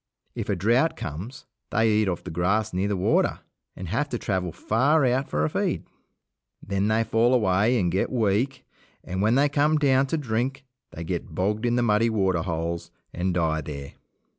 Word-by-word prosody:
If - - -5
a 100 - +2
drought 120 - +2
comes, 90 - -7 0.2
they 115 +1 +2
eat 110 -1 +2
off 90 - -3
the - - -7
grass 95 +6 0
near 95 +2 0
the 100 -1 -1
water 90 - +1 0.3
and 95 - -7
have 145 - -1
to 120 - -2
travel 95 -5 -2
far 135 - +2
out 130 +2 +1
for 75 +1 0
a - - 0
feed. - - -1 0.7
Then 100 +1 -1
they 110 +1 +2
fall 115 +3 +2
away 105 +2 +2
and 90 -3 +1
get 95 +3 0
weak, 120 +3 0 0.4
and 95 +1 -3
when 110 +3 +3
they 140 +2 +4
come 145 +2 +2
down 135 -2 +3
to 160 - -1
drink 130 0 -2 0.2
they 85 - -8
get 85 -2 -4
bogged 105 +6 0
in 120 - +1
the 120 - +2
muddy 115 0 +3
waterholes 85 -5 -1 0.2
and 90 +1 -1
die 80 -2 +1
there. 70 -1 -7
105 Hz, 190 wpm, -25 LUFS, 90-125 Hz, 0.7 s, they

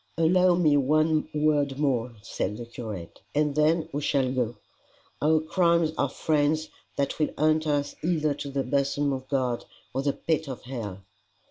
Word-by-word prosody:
"Allow 180 +2 +4
me 160 -4 +4
one 155 +3 +2
word 150 -2 +1
more," 125 -5 0
said 105 -2 -3
the 120 - -6
curate, 110 -7 -8
"and 150 -1 +2
then 155 +2 +2
we 145 - -1
shall 135 -3 +1
go: 120 -2 -1 0.7
Our 155 +1 +4
crimes 170 0 +2
are 140 - +1
friends 155 +2 +1 0.3
that 140 +2 -1
will 155 - +2
hunt 155 +1 +2
us 145 -1 0
either 155 -3 +1
to 145 0 -6
the 135 0 -1
bosom 140 +1 0
of 130 0 -5
God, 130 -4 0 0.3
or 135 - 0
the 140 0 0
pit 160 -1 -1
of 130 -3 -6
hell." 110 -7 -6
145 Hz, 165 wpm, -27 LUFS, 130-155 Hz, 0.7 s, Allow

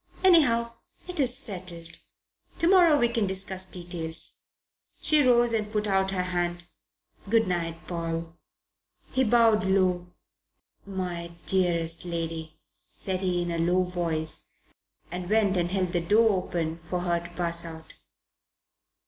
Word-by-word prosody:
"Anyhow, 235 -11 +4 0.3
it's 275 -9 +4
settled. 175 -8 -3 0.6
Tomorrow 340 -3 +5
we 240 - +3
can 230 -3 -1
discuss 190 0 +2
details." 175 -3 -1 0.6
She 305 -1 +3
rose 240 -3 +4
and 210 -2 -1
put 210 -1 -1
out 190 -1 +1
her 185 -2 -1
hand. 175 -1 -2 0.7
"Good 225 -1 +3
night, 170 -2 -3
Paul." 165 -1 -4 0.8
He 260 - +2
bowed 230 -2 +4
low. 185 -2 +1 0.8
"My 175 -3 -5
dearest 170 -3 +2
lady," 165 -2 -5 0.4
said 190 -1 -2
he 180 -2 0
in 175 - -3
a 170 - -2
low 180 +2 +2
voice, 170 -3 -3 0.6
and 180 0 -5
went 210 -2 +2
and 175 -1 0
held 185 -1 0
the 175 -1 -1
door 215 +6 +4
open 165 -1 -3
for 175 +2 -4
her 175 -1 0
to 170 0 -10
pass 170 -1 0
out. 160 -1 -10
180 Hz, 130 wpm, -26 LUFS, 170-215 Hz, 0.8 s, Tomorrow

